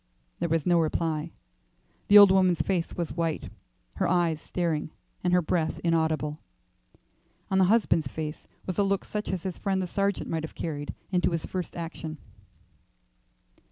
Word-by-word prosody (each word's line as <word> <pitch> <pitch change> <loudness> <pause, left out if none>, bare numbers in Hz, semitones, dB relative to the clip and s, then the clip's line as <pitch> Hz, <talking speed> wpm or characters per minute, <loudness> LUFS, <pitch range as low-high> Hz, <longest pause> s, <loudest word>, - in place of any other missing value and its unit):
There 170 - -1
was 165 -2 +1
no 175 -1 +4
reply; 160 0 -1 0.8
the 205 - +8
old 200 -2 +10
woman's 185 -5 +3
face 180 -4 -1
was 170 -2 -2
white, 165 -2 -2 0.5
her - - +1
eyes 170 -3 +1
staring, 165 -4 -2 0.3
and 180 - +1
her 180 -1 +4
breath 160 0 0
inaudible; 160 -3 0 1.1
on 190 - +3
the 190 - +6
husband's 190 -7 +3
face 150 +3 -6 0.2
was 185 +1 -3
a - - +5
look 195 0 0
such 210 0 -4
as 185 -3 -3
his 185 -3 -4
friend 195 -2 0
the 185 - -1
sergeant 200 +2 -1
might 165 -1 -2
have 160 - -7
carried 145 -3 -4 0.2
into 180 -1 +2
his 165 -2 -2
first 185 -2 -5
action. 165 -2 -6
170 Hz, 160 wpm, -27 LUFS, 160-185 Hz, 1.1 s, old